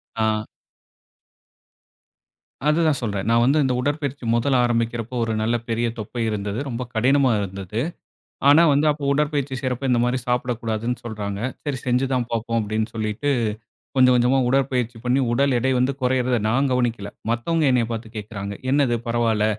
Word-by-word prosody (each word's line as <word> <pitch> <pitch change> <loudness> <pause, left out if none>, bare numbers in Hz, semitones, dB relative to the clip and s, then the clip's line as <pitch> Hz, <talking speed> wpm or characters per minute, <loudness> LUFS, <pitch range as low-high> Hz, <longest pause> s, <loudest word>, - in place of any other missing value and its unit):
ஆ. 110 -1 0 2.2
அதுதான் 155 -2 +2
சொல்றேன். 100 -5 -2
நான் 115 0 +4
வந்து 140 +5 +3
இந்த 130 -2 +1
உடற்பயிற்சி 140 -1 -2
முதல்ல 130 +3 +2
ஆரம்பிக்கிறப்ப, 115 0 -1
ஒரு 115 -1 -1
நல்ல 115 +2 +1
பெரிய 115 +1 0
தொப்பை 115 +3 -5
இருந்தது. 105 0 -3
ரொம்ப 125 0 -3
கடினமா 130 +3 +3
இருந்தது. 100 +1 -4 0.7
ஆனா 160 +4 +7
வந்து 145 +2 +3
அப்போ 145 -1 -7
உடற்பயிற்சி 145 -2 0
செய்யறப்ப, 130 0 -2
இந்த 120 -1 +3
மாதிரி 125 +1 +1
சாப்பிடக்கூடாதுன்னு 120 -1 -1
சொல்றாங்க. 105 -3 -4 0.2
சரி 145 -3 -2
செஞ்சு 125 +2 +2
தான் 125 -2 0
பார்ப்போம் 115 0 -1
அப்படின்னு 110 +1 -1
சொல்லிட்டு, 110 +6 -2 0.7
கொஞ்சம் 130 -1 +6
கொஞ்சமா 125 +2 +3
உடற்பயிற்சி 125 -3 0
பண்ணி 125 +2 +2
உடல் 135 +2 +2
எடை 130 +2 +1
வந்து 130 +2 +2
குறையறத 125 -1 +1
நான் 135 +4 +2
கவனிக்கல. 115 -5 -1 0.2
மத்தவங்க 155 +8 0
என்னய 125 -2 +2
பார்த்து 115 0 -5
கேக்குறாங்க. 100 -1 -5 0.2
"என்னது 135 -4 +3
பரவாயில்ல, 115 -2 +1
120 Hz, 145 wpm, -22 LUFS, 110-135 Hz, 2.2 s, ஆனா